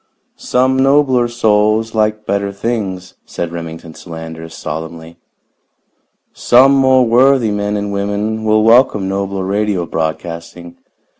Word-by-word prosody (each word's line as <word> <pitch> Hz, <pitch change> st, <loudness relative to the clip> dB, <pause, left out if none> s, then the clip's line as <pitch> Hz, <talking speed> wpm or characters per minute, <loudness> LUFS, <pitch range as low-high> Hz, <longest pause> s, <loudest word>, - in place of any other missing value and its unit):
"Some 130 Hz, +1 st, 0 dB
nobler 135 Hz, -3 st, +3 dB
souls 110 Hz, -1 st, +1 dB
like 110 Hz, -1 st, 0 dB
better 100 Hz, 0 st, -1 dB
things," 100 Hz, -4 st, -4 dB
said 85 Hz, -1 st, -5 dB
Remington 80 Hz, -1 st, -8 dB
Solander 80 Hz, -1 st, -9 dB
solemnly. 80 Hz, +1 st, -8 dB, 1.2 s
"Some 130 Hz, +3 st, +4 dB
more 130 Hz, -2 st, +4 dB
worthy 125 Hz, 0 st, +3 dB
men 105 Hz, 0 st, -2 dB
and 100 Hz, 0 st, -4 dB
women 105 Hz, +2 st, -2 dB
will 110 Hz, 0 st, +2 dB
welcome 115 Hz, -4 st, +3 dB
nobler 95 Hz, 0 st, -3 dB
radio 100 Hz, -2 st, -1 dB
broadcasting. 85 Hz, +2 st, -5 dB
105 Hz, 115 wpm, -15 LUFS, 85-115 Hz, 1.2 s, Some